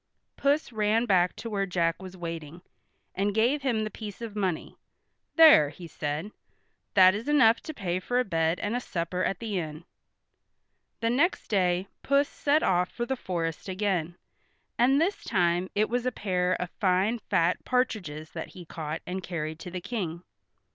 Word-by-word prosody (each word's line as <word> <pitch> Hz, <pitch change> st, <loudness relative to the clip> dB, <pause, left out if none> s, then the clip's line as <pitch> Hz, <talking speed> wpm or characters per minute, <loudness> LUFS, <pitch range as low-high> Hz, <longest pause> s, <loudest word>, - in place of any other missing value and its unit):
Puss 285 Hz, 0 st, +1 dB
ran 220 Hz, +1 st, +2 dB
back 185 Hz, -4 st, +3 dB
to 230 Hz, -, -7 dB
where 200 Hz, -3 st, -1 dB
Jack 170 Hz, -1 st, 0 dB
was 190 Hz, 0 st, -9 dB
waiting, 165 Hz, -1 st, -6 dB, 0.5 s
and 200 Hz, +1 st, -1 dB
gave 245 Hz, +6 st, +2 dB
him 240 Hz, -5 st, 0 dB
the 215 Hz, -, -4 dB
piece 210 Hz, -2 st, -8 dB
of 230 Hz, -3 st, -7 dB
money. 190 Hz, -5 st, -2 dB, 0.6 s
"There," 310 Hz, -, +8 dB
he 170 Hz, +4 st, -11 dB
said. 150 Hz, +4 st, -4 dB, 0.6 s
"That 185 Hz, -1 st, +8 dB
is 215 Hz, +6 st, -5 dB
enough 260 Hz, -6 st, +5 dB
to 315 Hz, -, -7 dB
pay 180 Hz, -5 st, -2 dB
for 245 Hz, +7 st, 0 dB
a -, -, +3 dB
bed 165 Hz, -2 st, 0 dB
and 210 Hz, +3 st, -1 dB
a -, -, +1 dB
supper 180 Hz, -5 st, -3 dB
at 195 Hz, -, 0 dB
the 210 Hz, -3 st, -2 dB
inn." 155 Hz, 0 st, -6 dB, 1.2 s
The 230 Hz, 0 st, +1 dB
next 325 Hz, +9 st, +1 dB
day 185 Hz, -2 st, +1 dB
Puss 280 Hz, +1 st, +3 dB
set 295 Hz, +2 st, +1 dB
off 180 Hz, 0 st, +2 dB
for 240 Hz, -, -4 dB
the 265 Hz, -, -1 dB
forest 170 Hz, -6 st, -3 dB
again, 185 Hz, -4 st, -1 dB, 0.6 s
and 265 Hz, +4 st, +4 dB
this 370 Hz, +6 st, 0 dB
time 175 Hz, 0 st, +1 dB
it 215 Hz, +1 st, +3 dB
was 245 Hz, +1 st, -1 dB
a -, -, +1 dB
pair 185 Hz, -5 st, 0 dB
of 180 Hz, -1 st, -3 dB
fine 195 Hz, +3 st, +2 dB
fat 170 Hz, -4 st, +1 dB
partridges 180 Hz, -12 st, -1 dB
that -, -, -5 dB
he 175 Hz, -, -9 dB
caught 160 Hz, -1 st, -5 dB
and 185 Hz, +1 st, -4 dB
carried 160 Hz, -3 st, -4 dB
to 180 Hz, -, -7 dB
the 180 Hz, 0 st, -5 dB
King. 175 Hz, -7 st, -4 dB
190 Hz, 175 wpm, -28 LUFS, 175-230 Hz, 1.2 s, There